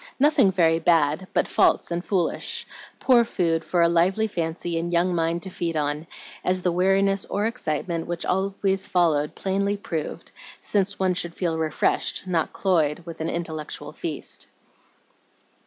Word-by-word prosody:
Nothing 285 -8 +5
very 165 -3 +3
bad, 160 +1 +2
but - - +1
false - - +2
and 170 +1 -2
foolish, 185 -4 -1 0.3
poor 245 -3 +5
food 165 -7 0
for 175 0 +2
a - - +6
lively 180 +6 +2
fancy 165 -2 -2
and 170 +1 -3
young 175 +1 +2
mind 170 0 0
to 190 - -6
feed 165 -3 -2
on, 150 +2 -2 0.4
as 185 0 +1
the 180 - +2
weariness 195 +2 +2
or 205 +2 -1
excitement 170 -7 -2
which 170 0 -4
always 195 +1 0
followed 165 -6 +2
plainly 200 +1 0
proved, 165 -4 -5 0.3
since 200 0 0
one 185 -1 +2
should 170 -1 -4
feel 170 -3 -1
refreshed, 155 -2 0
not 175 -3 0
cloyed, 165 -4 +1
with 165 -2 -8
an 160 - -1
intellectual 160 -3 -5
feast. - - -5
175 Hz, 155 wpm, -24 LUFS, 165-195 Hz, 0.4 s, a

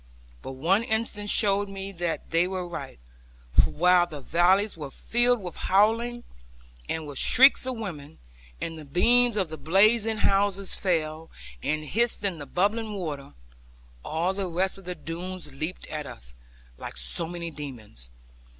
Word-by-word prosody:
But 135 - -7
one 175 - +2
instant 220 -2 -2
showed 200 -1 +2
me 195 0 -6
that 170 -4 -4
they 165 +2 +3
were 185 -1 -3
right; 155 -6 -7 0.6
for - - +5
while 180 +1 +4
the 155 -4 -8
valley 175 +8 +3
was 145 -4 -8
filled 240 +1 +2
with 180 -4 -7
howling, 230 +5 +2 0.7
and 160 -1 -2
with 145 -2 -4
shrieks 265 0 +5
of 255 -2 -3
women, 160 -8 -7 0.4
and 165 -1 -5
the - - -9
beams 235 - +3
of 190 -5 0
the 160 -1 -8
blazing 215 +6 +4
houses 200 -2 +1
fell, 160 -3 -1 0.3
and 155 - -1
hissed 230 +6 +1
in 190 -5 +1
the 145 - -8
bubbling 210 +2 0
river; 145 - -6 0.7
all 170 +4 -1
the 190 -1 -3
rest 190 +3 -1
of 195 - -16
the 180 0 -4
Doones 170 -2 -6
leaped 155 +6 -4
at 150 -2 -5
us, 60 +1 -11 0.5
like - - -7
so 60 - -1
many 170 -1 -5
demons. 115 - -9
180 Hz, 160 wpm, -26 LUFS, 155-205 Hz, 0.7 s, for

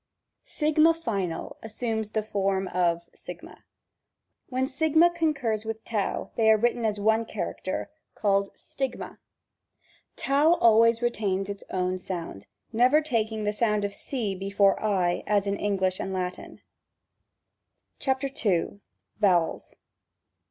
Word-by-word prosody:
6 310 0 +1 0.2
final 190 - -3
assumes 220 -1 -3
the 215 0 -1
form 195 -2 -1
of 170 -1 +1
g. - - -8 1.1
When 255 0 0
Sigma 315 +5 +3
con 325 -2 +1
curs 225 -5 -2
with 220 0 -5
T - - -13 0.4
they 220 -1 +3
are 220 - +6
written 240 +1 +1
as 210 -1 0
one 220 +2 +3
character, 215 +2 -4
g^ 315 - -47
called 200 -1 +1
Stigma. 270 -2 -5 1.1
r 290 +4 +5
always 230 +1 +5
retams 200 -5 -1
its 200 -1 -6
own 185 0 -1
sound; 170 - -6 0.3
never 250 +6 +5
ta^g 220 -7 -1
the 210 - 0
sound 210 -1 +1
of 200 - -4
c 225 -3 -3
before 195 +1 +2 0.3
% 175 - -2
as 205 -1 +2
in 200 0 0
English 190 -3 0
and 195 - -3
Latin. 180 -1 -5 1.4
§2. 260 -9 0 0.4
Vowels. 180 -6 +1
215 Hz, 125 wpm, -27 LUFS, 195-240 Hz, 1.4 s, are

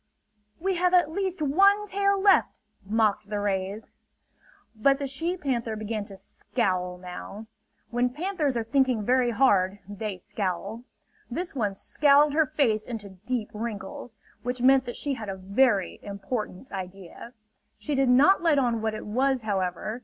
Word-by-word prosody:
"We 375 +1 0
have 360 +1 +3
at 350 -4 +4
least 375 -2 -2
one 395 +8 +4
tail 400 0 +1
left!" 390 0 +3 0.2
mocked 210 0 +1
the 210 -1 -2
rays. 200 +1 -2 0.8
But 275 +5 +3
the 280 - -3
she 325 +7 -2
panther 240 -8 -2
began 215 -1 -4
to 195 -2 -12
scowl 185 -4 -2
now. 180 +4 -8 0.5
When 245 +1 +1
panthers 300 -2 -1
are 230 - 0
thinking 245 -2 +1
very 250 0 +3
hard 205 -5 +3
they 205 -1 -5
scowl. 200 +5 -4 0.4
This 340 +8 -4
one 210 -7 -1
scowled 290 +6 +4
her 315 0 +3
face 240 -8 +1
into 220 -4 -6
deep 220 +4 -4
wrinkles; 215 +1 -6 0.3
which 245 0 -3
meant 265 0 +5
that 240 - -5
she 285 - -2
had 225 -5 -6
a 195 - -3
very 200 +1 +1
important 205 +2 -5
idea. 190 +4 -8 0.4
She 300 - -4
did 270 -2 +2
not 280 +11 +5
let 325 -4 +3
on 240 -4 +1
what 220 -1 -1
it 215 - -7
was, 260 +4 +1
however. 195 +2 -2
235 Hz, 155 wpm, -26 LUFS, 205-280 Hz, 0.8 s, meant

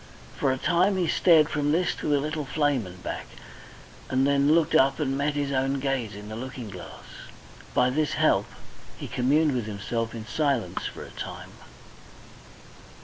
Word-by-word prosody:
For 135 - +1
a 130 - -1
time 185 +7 +2
he 180 -2 +1
stared 160 -2 +5
from 145 -1 0
this 175 +2 +2
to - - -4
the 145 -1 +3
little 150 +1 -3
flame 145 -6 0
and 90 0 -12
back, - - -5 0.8
and 130 +1 +2
then 140 +1 +3
looked 165 -3 +2
up 135 +2 +4
and 135 -3 0
met 145 +1 0
his 145 -1 -1
own 135 +1 0
gaze 130 -6 -2
in 105 0 -9
the 110 - -6
looking 125 -2 -7
glass. 90 -3 -10 0.7
By 125 0 +4
this 150 +2 0
help - - +2 0.5
he - - -6
communed 145 +5 +2
with 120 -4 -2
himself 115 +3 -3
in 110 -1 -7
silence 140 0 -1
for - - -8
a - - -11
time. - - -7
135 Hz, 175 wpm, -26 LUFS, 120-150 Hz, 0.8 s, stared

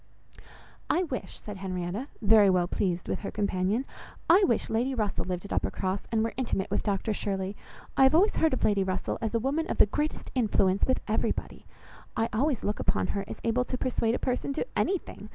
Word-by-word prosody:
"I 360 - +3
wish," 270 -8 -5
said 210 -2 -8
Henrietta, 185 +5 -3 0.2
very 210 -1 +7
well 180 -2 +3
pleased 180 -1 -1
with - - -2
her 205 - -5
companion, 200 +4 0 0.4
"I 360 +5 +6
wish 235 - +1
Lady 245 +4 0
Russell 210 -4 -1
lived 180 0 -3
at 200 - -5
Uppercross, 190 0 -1
and 220 -1 +2
were 230 - -2
intimate 235 -7 -1
with - - +1
Dr 205 +1 -1
Shirley. 195 -1 -2 0.4
I - - +2
have 265 +3 +6
always 390 +6 +4
heard 320 -3 +3
of - - -4
Lady 200 -2 +3
Russell 185 0 -2
as 225 0 -1
a - - +3
woman 285 +7 -1
of - - -2
the - - +7
greatest 300 +9 -3
influence 200 -6 +2
with 260 - +1
everybody! 220 - -2 0.5
I 225 - +1
always 260 +2 +1
look 210 - -1
upon - - +1
her 200 - -2
as - - -7
able 230 +2 +2
to 255 - -3
persuade 235 -2 0
a - - 0
person 255 +2 -1
to 310 - -2
anything! 380 -2 -2
220 Hz, 205 wpm, -28 LUFS, 195-260 Hz, 0.5 s, very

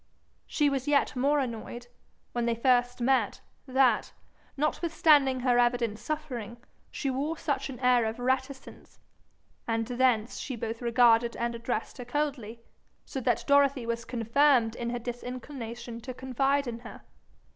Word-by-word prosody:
She 295 - +1
was 275 -1 -1
yet 285 -2 +2
more 280 +4 +2
annoyed, 240 -2 -4 0.5
when 240 -1 -1
they 235 - +1
first 245 +1 +2
met, 245 -4 +1 0.3
that, 255 -4 +2 0.4
notwithstanding 295 -3 +3
her 245 -1 +3
evident 240 -3 +1
suffering, 240 -4 -5 0.3
she 275 - -3
wore 290 +5 -2
such 285 -3 -2
an 255 -3 -8
air 250 -2 +4
of 220 +1 -3
reticence, 260 +2 -3 0.7
and 225 -1 0
thence 245 -2 +1
she 265 - -4
both 225 +1 -5
regarded 235 -1 +4
and 235 0 -1
addressed 235 +1 -4
her 245 - -6
coldly; 245 -4 -3 0.4
so 265 - -5
that - - 0
Dorothy 280 -3 +3
was 235 0 -2
confirmed 245 0 +2
in 235 0 -4
her 245 - -2
disinclination 240 -1 -7
to 255 +1 -7
confide 270 +2 0
in 235 -2 -5
her. 240 - -11
245 Hz, 145 wpm, -28 LUFS, 235-270 Hz, 0.7 s, air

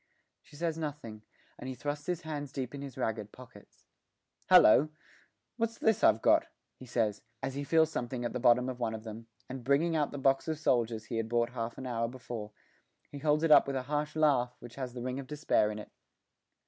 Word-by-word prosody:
She 145 - -18
says 165 +1 -2
nothing, 145 -9 -6 0.4
and 130 - -6
he 130 - -5
thrusts 145 +2 -4
his 180 -1 -1
hands 145 -4 -5
deep 130 -3 -4
in 140 - -6
his 140 -3 -8
ragged 105 -2 -2
pockets. 125 -5 -16 0.6
'Hallo! 145 +8 +7 0.7
what's 230 -1 -1
this 220 0 +2
I've 110 +1 +5
got?' - - +4 0.3
he 130 - -11
says, 110 -4 0 0.2
as 135 0 -2
he 140 +1 -3
feels 160 +2 +3
something 120 -3 -3
at 120 - -3
the 125 - -2
bottom 125 +1 +4
of 130 -1 -5
one 115 -2 -1
of 110 - -8
them, 115 0 -8 0.2
and, 130 -1 -7
bringing 145 +6 +2
out 150 -2 +1
the 145 - -6
box 135 +1 +2
of 160 -1 -1
soldiers 115 -6 0
he 115 +2 -4
had 115 0 -2
bought 120 0 +1
half 115 -2 -4
an 130 - -7
hour 115 -2 -1
before, 120 -3 -7 0.6
he 145 - -7
holds 150 +1 +2
it 165 - +3
up - - +8
with 140 - -2
a 130 - -1
harsh 150 +2 -2
laugh 135 -6 +2
which 120 -1 -11
has 130 -3 -5
the 120 - -5
ring 130 +1 -3
of 135 - -7
despair 145 -7 +1
in 105 - -5
it. 105 - -9
130 Hz, 220 wpm, -31 LUFS, 115-150 Hz, 0.7 s, up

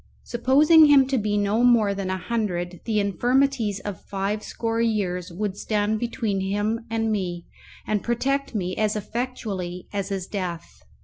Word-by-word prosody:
Supposing 295 +7 +5
him 280 -2 +6
to 270 - +1
be 210 0 0
no 205 +3 +1
more 230 -5 +4
than 195 -1 -4
a 190 - -1
hundred, 180 -5 -2
the 220 -2 +1
infirmities 235 +1 +1
of 205 -4 -6
five 200 +2 -3
score 230 +1 -2
years 185 -6 -1
would 195 +2 -3
stand 210 +1 0
between 225 -4 -2
him 205 +4 -1
and 225 -1 0
me, 175 -4 -2 0.4
and 210 -2 0
protect 275 +2 -1
me 185 -2 -2
as 215 -1 +1
effectually 210 -6 -4
as 200 -1 -2
his 195 -2 -3
death. 180 -5 -4
210 Hz, 160 wpm, -24 LUFS, 195-235 Hz, 0.4 s, him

